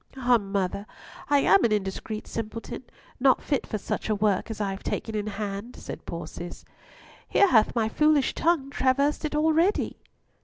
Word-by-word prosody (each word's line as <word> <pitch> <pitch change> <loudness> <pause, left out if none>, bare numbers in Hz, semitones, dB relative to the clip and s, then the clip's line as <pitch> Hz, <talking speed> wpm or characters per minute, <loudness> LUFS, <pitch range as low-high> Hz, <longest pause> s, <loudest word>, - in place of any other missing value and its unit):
"Ah! 245 -2 +4
mother, 200 0 -2 0.4
I 285 -1 +4
am 195 -2 +5
an 235 - +3
indiscreet 210 +1 -2
simpleton, 230 +3 -6 0.3
not 260 0 +4
fit 280 -4 -1
for 215 - -2
such 205 - -4
a 215 - +2
work 205 0 +1
as 220 - -5
I 200 -2 -1
have 195 - -6
taken 225 - -3
in 210 -1 -2
hand," 205 +2 -5
said - - -9
poor - - -5
Cis. - - -9 0.6
"Here 400 - +5
hath 220 -4 +4
my 225 -2 +2
foolish 300 +3 +3
tongue 320 -5 +1
traversed 280 +4 +1
it 300 - -2
already!" 320 +5 +2
225 Hz, 175 wpm, -26 LUFS, 205-280 Hz, 0.6 s, am